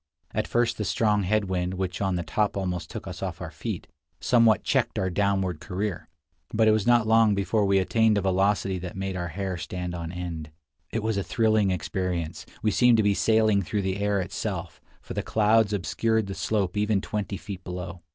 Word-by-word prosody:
At - - -1
first 120 -1 +1
the - - 0
strong 105 0 +2
head 105 +2 +1
wind, 90 -1 -2
which 95 0 -3
on 95 -2 +1
the 85 - -2
top 100 +5 0
almost 90 -2 -3
took - - -7
us - - -7
off - - -4
our - - -6
feet, - - -5 0.3
somewhat 115 -3 +4
checked - - +1
our 95 -1 0
downward 95 -3 0
career, 95 0 -4 0.4
but 110 0 +3
it - - +7
was 110 0 +1
not 120 -2 +5
long 110 -1 +4
before 100 +2 +1
we 100 0 +4
attained 110 +3 +3
a - - +2
velocity 95 0 +1
that 90 +1 -7
made 95 0 -3
our 85 -1 -3
hair 95 +2 -3
stand 90 +2 -5
on 85 -1 -5
end. 85 -3 -5 0.4
It 115 0 -3
was 110 -2 0
a - - +2
II - - -1
73 - - -9
thrilling 110 -3 +3
experience; 90 -3 -2 0.2
we 110 - +3
seemed 120 0 +5
to 110 - +3
be 100 0 +3
sailing 110 -1 +3
through 100 +3 -2
the 95 0 -1
air 100 0 +1
itself, 90 - -4 0.2
for - - -7
the - - -1
clouds 110 0 +3
obscured 110 +3 0
the 95 - -5
slope 100 -2 -1
even 105 -1 +2
twenty 105 -1 -3
feet 95 -2 -8
below. 90 0 -6
100 Hz, 210 wpm, -26 LUFS, 90-110 Hz, 0.4 s, it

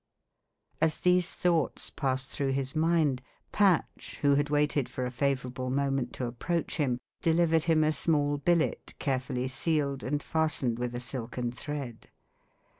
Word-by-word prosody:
As 160 -1 +2
these 180 0 +3
thoughts 170 -5 0
passed 130 -1 -1
through 135 -2 -1
his 135 0 -2
mind, 155 -5 +2 0.3
Patch, 195 -5 +1
who 140 0 +5
had 145 +1 +2
waited 145 -2 +1
for 130 - -3
a 125 - -3
favourable 130 -1 -1
moment 135 -1 0
to 125 - -3
approach 165 +10 -2
him, 135 -6 +1 0.2
delivered 165 -1 +3
him 160 -2 +4
a 155 0 +2
small 145 -1 +1
billet 170 +2 0
carefully 130 -2 -1
sealed, 140 +1 -1
and 145 +3 -2
fastened 145 -7 0
with 120 0 -2
a - - -2
silken 120 -1 -4
thread. 135 -3 -6
140 Hz, 145 wpm, -29 LUFS, 130-160 Hz, 0.3 s, who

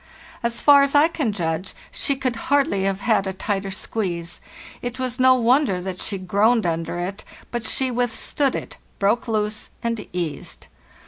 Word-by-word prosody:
As 235 -1 -1
far 285 -1 +8
as 280 +1 +2
I 290 +2 +7
can 300 -9 -1
judge, 170 -2 -3 0.2
she 280 - 0
could 260 -2 -1
hardly 275 -9 +2
have 195 0 -1
had 210 -4 +2
a 190 - -2
tighter 195 +1 -2
squeeze; 180 -4 -3 0.4
it 245 +1 -4
was 255 -1 -3
no 255 0 +6
wonder 245 -4 +3
that 185 0 -5
she 200 - -3
groaned 205 +5 +2
under 165 0 -1
it; 185 +3 -4 0.3
but 235 -2 -3
she 260 -1 +1
withstood 245 +3 0
it, - - -6 0.2
broke 205 +5 +1
loose, 215 -1 -1
and 230 -2 -2
eased. 170 -4 -4
220 Hz, 170 wpm, -23 LUFS, 190-255 Hz, 0.4 s, far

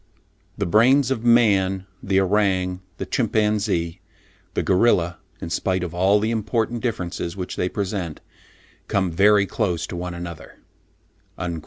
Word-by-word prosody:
The - - -1
brains 125 +8 +4
of 115 -4 -1
man, 100 -6 +3 0.2
the 95 0 +1
orang, 95 -2 +1 0.2
the - - -4
chimpanzee, 105 -6 0 0.5
the - - 0
gorilla, 90 -4 +2 0.2
in 85 - -6
spite 95 +2 0
of 85 -2 -5
all 95 +4 +3
the 110 +2 0
important 115 +1 -1
differences 90 -6 -3
which 90 -1 -5
they 90 - -1
present, 95 -6 -3 0.7
come 95 -3 0
very 100 +4 +4
close 90 -5 -1
to - - -7
one 90 0 -5
another" 85 -2 -8 0.8
(loc. 85 -2 -3
95 Hz, 140 wpm, -22 LUFS, 90-105 Hz, 0.8 s, brains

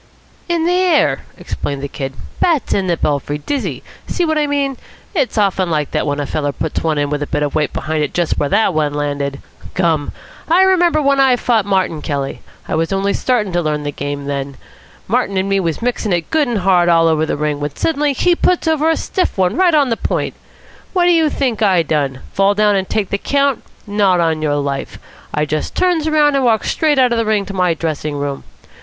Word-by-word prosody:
"In 335 -1 +1
the 350 - +2
air," 360 -4 +2
explained 140 -1 -4
the - - -2
Kid. 135 -1 -5 0.3
"Bats 325 -6 +1
in 195 -2 0
the 170 -2 +1
belfry. 145 0 -1
Dizzy. 275 - -3 0.2
See 355 - 0
what 315 -1 0
I 295 - +1
mean? 280 -2 -1 0.4
It's 280 - 0
often 195 -3 +1
like 150 -3 -1
that - - -1
when 145 0 -1
a 145 - -1
feller 145 0 -2
puts 155 +2 -3
one 160 -2 0
in 145 0 0
with 150 0 -1
a 145 - -2
bit 150 -1 -1
of 145 - -2
weight 150 -2 0
behind 155 -1 -2
it 145 - -2
just 175 -2 -1
where 145 - 0
that 205 +4 +2
one 150 -2 0
landed. 145 -1 -2 0.4
Gum! 165 -5 +1 0.4
I 355 +3 +5
remember 350 -5 +3
when 275 0 +3
I 265 -2 +5
fought 230 -4 +1
Martin 190 -5 0
Kelly; 140 -2 -3 0.3
I - - -3
was 165 +2 0
only 195 +1 0
starting 220 -7 0
to 175 - +1
learn 150 -2 -1
the 145 - -3
game 145 0 -5
then. 140 -1 -4 0.5
Martin 210 -3 0
and 190 +1 0
me 195 0 +1
was 170 +3 -2
mixing 235 -5 -1
it 170 -2 -2
good 310 -3 +2
and 240 -2 -1
hard 180 -2 +3
all 165 -1 +4
over 160 -1 +1
the - - -1
ring, 150 -1 -1
when 145 0 -4
suddenly 295 -2 0
he 355 +6 +2
puts 350 -1 +1
over 315 0 +2
a 325 - +2
stiff 370 - -2
one 185 0 +1
right 355 -2 +3
on 285 -3 +3
the 230 - 0
point. - - -2 0.6
What 360 -2 +3
do 355 - +5
you 325 -3 +3
think 250 -7 -1
I 190 -5 +4
done? 140 -4 -1
Fall 195 +1 +3
down 210 0 +3
and 190 -1 -1
take 210 -3 -1
the 200 - 0
count? 280 0 +1 0.2
Not 200 -3 +2
on 160 -2 +1
your 150 -2 0
life. 140 -1 -3 0.3
I 150 +1 0
just 155 +1 -3
turns 345 -4 +1
round 300 -2 +3
and 275 - +2
walks 225 -3 +2
straight 305 -3 +1
out 255 -2 +4
of 235 - +1
the 230 - 0
ring 210 -2 +1
to 195 - -7
my 180 -3 +1
dressing 155 -2 -3
room. 140 -1 -3
190 Hz, 230 wpm, -17 LUFS, -, 0.6 s, I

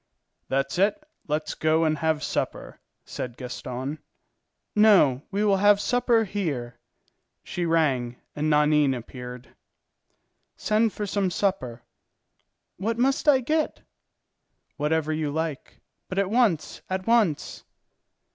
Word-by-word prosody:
"That's 135 +5 -1
it, 205 +9 +3 0.3
let's 150 +1 -2
go 160 +1 +2
and 155 -2 +1
have 160 -1 0
supper," - - -3 0.3
said 125 -1 -6
Gaston. 130 +3 -5 0.8
"No, 195 -12 +5
we 200 +1 -1
will 200 -2 +3
have 205 +1 +5
supper 240 +1 +2
here." 145 - -4 0.6
She 175 -1 -3
rang, 135 -7 +1 0.2
and 150 +1 -1
Nanine 150 -2 +3
appeared. 125 +1 -9 1.1
"Send 215 +1 +2
for 210 - -4
some 200 -1 0
supper." 170 - -2 0.9
"What 220 +5 -2
must 270 +5 +1
I 265 -3 +5
get?" 310 +5 -1 0.9
"Whatever 155 +1 0
you 155 -1 -1
like, 160 -1 -4 0.3
but 185 - -5
at 200 0 +1
once, 220 -10 +1
at 185 0 -2
once." 225 -10 +1
160 Hz, 120 wpm, -25 LUFS, 140-205 Hz, 1.1 s, No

